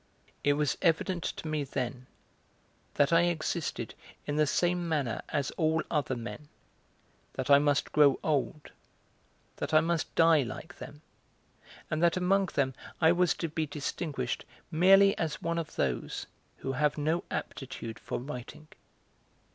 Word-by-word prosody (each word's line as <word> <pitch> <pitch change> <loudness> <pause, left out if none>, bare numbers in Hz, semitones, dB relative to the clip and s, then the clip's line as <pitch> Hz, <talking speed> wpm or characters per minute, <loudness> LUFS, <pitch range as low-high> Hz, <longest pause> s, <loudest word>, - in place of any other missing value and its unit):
It 145 - +4
was 150 0 0
evident 170 +1 +1
to - - -4
me 155 -1 -1
then 130 -2 -4 0.9
that 145 +2 +3
I 165 +1 +5
existed 160 -8 -2 0.3
in 145 - -2
the 150 0 +3
same 175 +2 +1
manner 140 -8 -1
as 145 -2 -1
all 160 0 +2
other 145 -4 0
men, 125 +5 -7 0.8
that - - -2
I 140 - +9
must 145 0 +1
grow 145 -3 +5
old, 150 0 -1 0.9
that - - -2
I - - +9
must 165 0 -1
die 165 -2 +6
like 135 +7 -7
them, 145 +4 -10 0.9
and 155 +1 0
that 170 +1 +3
among 190 +2 +2
them 135 -5 0 0.3
I 160 -1 +6
was 180 0 +3
to 165 - -2
be 155 0 -2
distinguished 140 -3 -3 0.3
merely 195 +4 +6
as 160 -2 -2
one 170 0 -1
of 165 - -6
those 65 -3 -2 0.3
who 135 - -3
have 150 +3 +1
no 155 +3 0
aptitude 130 -4 -5
for - - -4
writing. 140 +4 -8
150 Hz, 145 wpm, -30 LUFS, 140-165 Hz, 0.9 s, I